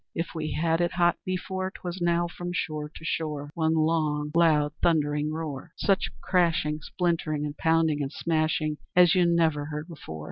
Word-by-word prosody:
If 165 +1 -3
we 155 -2 -3
had 165 +1 +1
it 175 +1 0
hot 175 -1 +2
before, 185 0 -3
'Twas 180 -1 -7
now, 175 0 +2
from 175 +1 -6
shore 155 -3 -3
to 160 - -12
shore, 150 -3 -3
One 160 -1 +1
long, 155 -2 +1
loud 155 -3 +3
thundering 150 -2 +2
roar, 155 0 -5
Such 195 -1 +1
crashing, 165 -4 +1
splintering, 160 -3 -1
and 145 0 -5
pounding 160 -2 +2
And 135 -1 -3
smashing 155 -2 0 0.2
as 175 -2 +7
you 180 -2 +4
never 160 -4 +2
heard 150 +1 -5
before. 145 - -9
160 Hz, 170 wpm, -27 LUFS, 150-170 Hz, 0.2 s, as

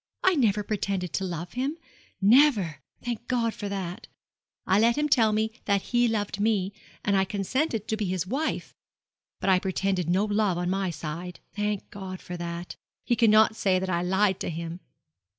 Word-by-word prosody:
I 375 - +5
never 215 - +2
pretended 195 -4 -2
to 195 - -1
love 175 -1 -4
him 270 +6 -2 0.4
never 205 - +5 0.3
thank 240 -1 -4
God 235 -3 +1
for 205 - -5
that! 195 +1 -5 0.6
I 190 +2 +3
let 230 +3 +4
him 300 0 +2
tell 230 -7 +4
me 220 +1 +1
that 200 -2 +2
he 240 0 +4
loved 205 -3 -1
me, 205 -2 +1 0.3
and 200 - +3
I 190 - +4
consented 215 - -1
to 220 - 0
be 215 - -1
his 185 -2 -1
wife; 275 +11 -2 0.7
but - - -3
I 185 - +5
pretended 190 -2 -1
no 190 +4 +3
love 205 -3 +1
on 175 +1 -1
my 195 -1 0
side. 170 +2 -6 0.2
Thank 210 -1 -2
God 190 -2 -7
for 180 - -7
that! 170 0 -6 0.3
He 240 - +2
cannot 220 -1 +5
say 190 -4 +2
that 185 0 -2
I 170 0 +1
lied 190 +2 +2
to - - -3
him.' 165 +1 -5
200 Hz, 185 wpm, -27 LUFS, 185-220 Hz, 0.7 s, I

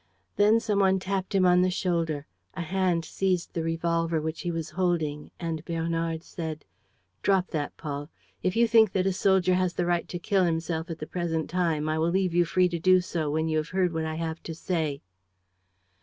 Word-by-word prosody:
Then 210 +2 +5
some 210 -3 0
one 190 -1 +4
tapped 190 +1 -3
him 190 -1 +4
on 180 0 +5
the 185 - +3
shoulder. 165 -5 -1 0.3
A 180 - -3
hand 180 -1 0
seized 185 +1 -1
the 165 - -1
revolver 165 0 0
which 160 +1 -4
he 175 - -3
was 165 -1 -3
holding; 165 -5 -1
and 165 -2 -3
Bernard 165 -1 -2
said: 160 -3 -6 0.6
"Drop 190 -2 +2
that, 150 -3 -3
Paul. 145 -1 -5 0.3
If 185 0 0
you 235 +1 +4
think 220 -3 +5
that 185 -1 +1
a 195 - +2
soldier 190 -1 +3
has 180 -1 +1
the 175 - 0
right 175 -1 0
to 175 - -3
kill 190 +2 +1
himself 165 0 -1
at 165 - -4
the 155 - -6
present 165 -2 -2
time, 165 -4 0
I 155 0 0
will 165 +1 +2
leave 185 -1 +1
you 175 0 +4
free 180 +2 +3
to 170 -1 -3
do 185 +2 +5
so 165 -4 -2
when 160 +2 0
you 155 -1 0
have 155 0 -2
heard 185 -2 +1
what 160 0 -1
I 160 0 -3
have 165 0 -4
to 165 - -6
say." 160 -5 -2
170 Hz, 210 wpm, -27 LUFS, 160-185 Hz, 0.6 s, Then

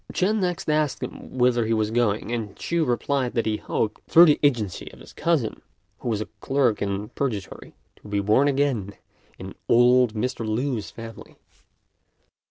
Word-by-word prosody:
Ch'ên 210 +4 +1
next 180 -3 -2
asked 150 -2 0
him - - -8
whither 125 -1 +3
he 115 - +2
was 110 -1 0
going; 110 -2 0
and 110 -4 -4
Ch'u 170 -1 -1
replied 125 0 0
that 115 - +1
he 110 -1 0
hoped, 110 0 -2
through 170 +2 +8
the 150 -3 +4
agency 115 - 0
of - - -16
his - - -14
cousin, 160 -10 -1 0.4
who 125 - -4
was 110 -2 -1
a - - -3
clerk 135 -6 +1
in 100 +1 -2
Purgatory, 110 -9 -5 0.2
to - - -15
be 100 0 -1
born 105 +8 +3
again 135 -9 0 0.4
in - - -8 0.2
old 120 -1 +5
Mr. 120 +2 -2
Lü's 115 +1 -2
family. 115 -1 -11
120 Hz, 170 wpm, -24 LUFS, 110-140 Hz, 0.4 s, through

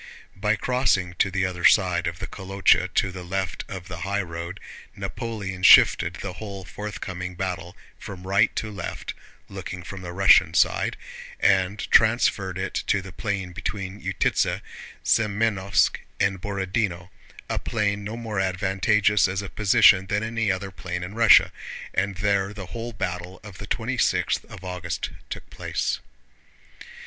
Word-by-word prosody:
By 105 +1 +1
crossing 105 -6 +1
to 95 - +3
the 95 0 0
other 90 -1 -4
side 90 -3 +4
of 85 +1 -3
the 95 - -5
Kolochá 95 -2 +1
to 95 - +2
the 90 0 -8
left 95 0 -3
of 95 -2 -7
the 90 -2 -7
highroad, 85 -2 -4 0.4
Napoleon 100 -5 -5
shifted 90 -2 +7
the 90 +1 -6
whole 100 -2 -8
forthcoming 90 -2 -6
battle 90 -2 -4 0.2
from 95 -2 -9
right 95 +1 +3
to 110 - -3
left 100 - -6 0.3
(looking 95 -2 -7
from 95 +1 -8
the 90 -1 -6
Russian 95 +2 +5
side) - - +2 0.4
and 100 +1 +2
transferred 110 -5 +3
it 95 0 -3
to 100 -2 +1
the 95 - -9
plain 95 -2 -3
between 100 0 -5
Utítsa, - - 0 0.4
Semënovsk, 105 -2 +2 0.2
and 95 -2 +1
Borodinó—a 95 -2 -4
plain 105 -3 -1
no 110 +3 -5
more 110 -4 -3
advantageous 95 +2 +2
as 95 +2 -3
a 100 - -6
position 105 -2 +5
than 105 +2 0
any 115 -2 0
other 95 +1 -3
plain 90 -1 -5
in 90 +3 -7
Russia—and 100 -3 +3
there 100 0 0
the 100 -3 -6
whole 120 0 -4
battle 90 -3 -5
of 100 -3 -11
the - - -7
twenty - - -2
sixth - - +1
of 95 - -12
August 90 -2 -4 0.2
took - - -7
place. - - -2
95 Hz, 145 wpm, -24 LUFS, 90-105 Hz, 0.4 s, shifted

